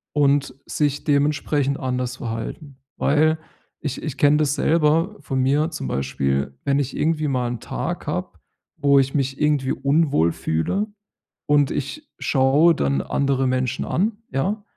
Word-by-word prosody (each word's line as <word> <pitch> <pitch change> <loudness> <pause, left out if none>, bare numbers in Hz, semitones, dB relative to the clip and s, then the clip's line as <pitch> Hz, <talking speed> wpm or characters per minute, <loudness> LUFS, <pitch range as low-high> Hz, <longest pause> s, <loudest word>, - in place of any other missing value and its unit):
und 140 -2 +2
sich 145 -1 -1
dementsprechend 145 -1 +1
anders 125 -1 -2
verhalten. 120 +5 -6 0.2
Weil, 155 +3 +2 0.4
ich 145 -3 -4
ich 150 -3 -4
kenne 145 +1 +5
das 150 -2 +1
selber 160 +5 +2
von 130 - -2
mir 145 +5 +2
zum 155 - -5
Beispiel, 70 0 -1
wenn 140 0 +2
ich 135 -2 -2
irgendwie 155 -1 +1
mal 125 -3 0
'n 120 -2 -4
Tag - - -4
habe, - - -2 0.5
wo 140 -1 +4
ich 135 +2 0
mich 135 -1 -1
irgendwie 145 -3 +2
unwohl 140 - +2
fühle 80 - -1 0.6
und 145 -1 +3
ich 285 - -4
schaue 145 +5 +4
dann 70 - 0
andere 135 - 0
Menschen 130 0 -1
an, 210 +6 0 0.2
ja, 195 +11 -1
140 Hz, 145 wpm, -22 LUFS, 130-150 Hz, 0.6 s, kenne